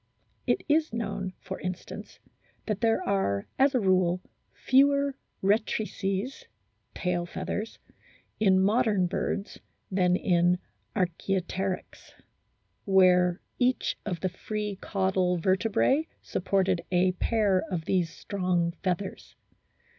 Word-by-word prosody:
It 370 Hz, -, +1 dB
is 315 Hz, +1 st, +2 dB
known, 200 Hz, -4 st, -3 dB
for 190 Hz, 0 st, -7 dB
instance, 185 Hz, -1 st, -6 dB, 0.5 s
that 215 Hz, -1 st, -2 dB
there 225 Hz, -1 st, +2 dB
are, 100 Hz, -, +1 dB
as 270 Hz, 0 st, +4 dB
a -, -, +4 dB
rule, 185 Hz, -3 st, +2 dB, 0.3 s
fewer 280 Hz, +1 st, +3 dB, 0.3 s
rectrices 210 Hz, -, -1 dB, 0.5 s
(tail 175 Hz, -1 st, -1 dB
feathers) 215 Hz, +5 st, -4 dB, 0.6 s
in 190 Hz, -3 st, +4 dB
modern 205 Hz, -1 st, +3 dB
birds 200 Hz, +2 st, -3 dB, 0.3 s
than 180 Hz, -1 st, +3 dB
in 175 Hz, -1 st, +3 dB, 0.4 s
Arch&opteryx, 185 Hz, +1 st, -2 dB, 0.7 s
where 180 Hz, -2 st, +4 dB, 0.2 s
each 250 Hz, 0 st, +1 dB
of 180 Hz, -5 st, -4 dB
the 185 Hz, -, 0 dB
free 210 Hz, +2 st, -4 dB
caudal 190 Hz, -2 st, +1 dB
vertebrae 200 Hz, -, +2 dB
supported 190 Hz, -2 st, 0 dB
a 185 Hz, +1 st, +3 dB
pair 200 Hz, 0 st, +1 dB
of 170 Hz, -4 st, -3 dB
these 180 Hz, -3 st, +1 dB
strong 180 Hz, -1 st, -1 dB
feathers. 190 Hz, +1 st, -3 dB
190 Hz, 105 wpm, -28 LUFS, 180-215 Hz, 0.7 s, as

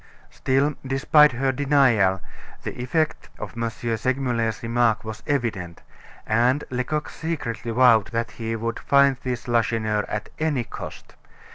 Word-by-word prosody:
Still 135 Hz, +3 st, +1 dB
despite 140 Hz, +2 st, +4 dB
her 135 Hz, +2 st, 0 dB
denial, 125 Hz, -9 st, +3 dB, 0.4 s
the -, -, -3 dB
effect 155 Hz, +5 st, -1 dB
of -, -, -7 dB
M. 115 Hz, 0 st, -1 dB
Segmuller's 115 Hz, 0 st, -1 dB
remark 115 Hz, -1 st, +1 dB
was 110 Hz, -1 st, -6 dB
evident, 110 Hz, -, -2 dB, 0.4 s
and 120 Hz, +6 st, +2 dB
Lecoq 130 Hz, +5 st, -2 dB
secretly 130 Hz, -9 st, -4 dB
vowed 115 Hz, -3 st, +5 dB
that 115 Hz, 0 st, -3 dB
he 115 Hz, -1 st, -4 dB
would 115 Hz, +1 st, -3 dB
find 140 Hz, -1 st, +4 dB
this 125 Hz, -2 st, -4 dB
Lacheneur, 110 Hz, -3 st, +1 dB
at 105 Hz, 0 st, -4 dB
any 150 Hz, -6 st, 0 dB
cost. -, -, -9 dB
120 Hz, 130 wpm, -24 LUFS, 115-135 Hz, 0.4 s, vowed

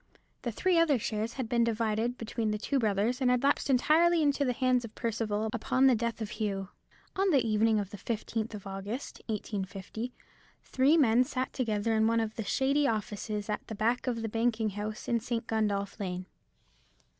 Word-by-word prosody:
The 240 Hz, -, -2 dB
three 355 Hz, -, +2 dB
other 310 Hz, -5 st, +4 dB
shares 220 Hz, 0 st, -2 dB
had 260 Hz, -4 st, -3 dB
been 235 Hz, 0 st, +2 dB
divided 230 Hz, +1 st, 0 dB
between 225 Hz, -1 st, -2 dB
the 210 Hz, -, 0 dB
two 270 Hz, +6 st, 0 dB
brothers, 220 Hz, +3 st, +1 dB
and 255 Hz, -, +3 dB
had 250 Hz, 0 st, +2 dB
lapsed 280 Hz, 0 st, +2 dB
entirely 320 Hz, +6 st, +4 dB
into 285 Hz, -1 st, +2 dB
the 255 Hz, -, +1 dB
hands 255 Hz, 0 st, +2 dB
of 225 Hz, -2 st, -9 dB
Percival 220 Hz, -2 st, -1 dB
upon 260 Hz, +1 st, +2 dB
the 265 Hz, -, +7 dB
death 235 Hz, 0 st, -2 dB
of 215 Hz, -, -4 dB
Hugh. 195 Hz, -3 st, -3 dB, 0.5 s
On 390 Hz, +1 st, +2 dB
the 275 Hz, -8 st, +3 dB
evening 215 Hz, 0 st, +3 dB
of 200 Hz, -1 st, -4 dB
the 205 Hz, -, -8 dB
15th 225 Hz, -1 st, -3 dB
of 205 Hz, -, -9 dB
August, 195 Hz, +6 st, -6 dB
1850, 210 Hz, +2 st, -4 dB, 0.5 s
three 275 Hz, +5 st, +3 dB
men 245 Hz, -4 st, +5 dB
sat 255 Hz, +1 st, -3 dB
together 225 Hz, -3 st, 0 dB
in 220 Hz, 0 st, +3 dB
one 230 Hz, 0 st, +2 dB
of 220 Hz, -1 st, -2 dB
the 225 Hz, -, -3 dB
shady 275 Hz, +6 st, +2 dB
offices 210 Hz, -2 st, -3 dB
at 210 Hz, -, -3 dB
the 220 Hz, -, -5 dB
back 235 Hz, +5 st, 0 dB
of 230 Hz, -2 st, -1 dB
the -, -, -1 dB
banking 225 Hz, -1 st, 0 dB
house 210 Hz, +2 st, -5 dB
in 235 Hz, -, +2 dB
St. 230 Hz, +1 st, -3 dB
Gundolph 210 Hz, -2 st, -1 dB
Lane. 185 Hz, -2 st, -3 dB
225 Hz, 190 wpm, -30 LUFS, 210-250 Hz, 0.5 s, the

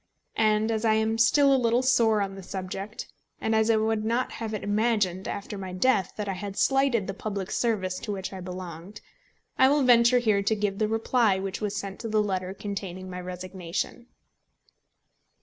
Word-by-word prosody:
And 215 Hz, +1 st, +3 dB
as 220 Hz, 0 st, -1 dB
I 220 Hz, -1 st, +4 dB
am 220 Hz, +1 st, 0 dB
still 275 Hz, +4 st, +5 dB
a 265 Hz, -, +3 dB
little 235 Hz, +2 st, +2 dB
sore 225 Hz, -5 st, +3 dB
on 195 Hz, 0 st, -4 dB
the 195 Hz, -, -9 dB
subject, 195 Hz, +3 st, -6 dB, 0.3 s
and 220 Hz, -, -1 dB
as 220 Hz, 0 st, +3 dB
I 225 Hz, -, +5 dB
would 220 Hz, 0 st, 0 dB
not 235 Hz, +3 st, 0 dB
have 225 Hz, -2 st, -5 dB
it 215 Hz, -, -4 dB
imagined 205 Hz, -3 st, 0 dB
after 200 Hz, 0 st, -5 dB
my 190 Hz, -1 st, -6 dB
death 190 Hz, 0 st, +1 dB
that 210 Hz, -1 st, -4 dB
I 195 Hz, -, -1 dB
had 195 Hz, +1 st, -6 dB
slighted 270 Hz, -6 st, +2 dB
the 195 Hz, -, -4 dB
public 200 Hz, -2 st, -5 dB
service 190 Hz, -6 st, -1 dB
to 210 Hz, -, -5 dB
which 195 Hz, -1 st, -5 dB
I 190 Hz, -, -6 dB
belonged, 180 Hz, +1 st, -8 dB, 0.6 s
I 260 Hz, -, +7 dB
will 290 Hz, 0 st, +3 dB
venture 240 Hz, 0 st, +6 dB
here 215 Hz, -4 st, +2 dB
to 210 Hz, +2 st, +1 dB
give 205 Hz, -1 st, -2 dB
the 215 Hz, -, +2 dB
reply 225 Hz, -1 st, +2 dB
which 190 Hz, +1 st, -4 dB
was 210 Hz, -1 st, -2 dB
sent 200 Hz, -1 st, -5 dB
to 230 Hz, -, -5 dB
the 215 Hz, -1 st, +2 dB
letter 185 Hz, -2 st, -2 dB
containing 190 Hz, -2 st, -6 dB
my 180 Hz, 0 st, -5 dB
resignation. 180 Hz, +5 st, -5 dB
210 Hz, 195 wpm, -27 LUFS, 190-225 Hz, 0.6 s, I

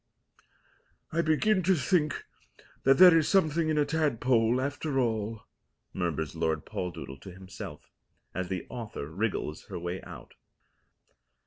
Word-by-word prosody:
"I 165 Hz, -, +2 dB
begin 185 Hz, +6 st, +2 dB
to 185 Hz, +2 st, +3 dB
think 155 Hz, 0 st, +1 dB, 0.6 s
that 135 Hz, 0 st, +6 dB
there 180 Hz, -2 st, +9 dB
is 160 Hz, -2 st, +3 dB
something 165 Hz, -4 st, +3 dB
in 155 Hz, -, +1 dB
a 150 Hz, -, +3 dB
tadpole 130 Hz, -6 st, +2 dB
after 140 Hz, +1 st, -1 dB
all," 110 Hz, -3 st, -1 dB, 0.5 s
murmurs 80 Hz, -5 st, -2 dB
Lord 80 Hz, -2 st, -1 dB
Poldoodle 80 Hz, -7 st, -5 dB
to 95 Hz, -, -9 dB
himself, 95 Hz, 0 st, -10 dB, 0.4 s
as 95 Hz, -1 st, -3 dB
the 95 Hz, -2 st, -3 dB
author 115 Hz, -, -6 dB
wriggles 90 Hz, -2 st, -3 dB
her -, -, -6 dB
way 90 Hz, +2 st, -4 dB
out. -, -, -11 dB
125 Hz, 130 wpm, -29 LUFS, 95-155 Hz, 0.6 s, there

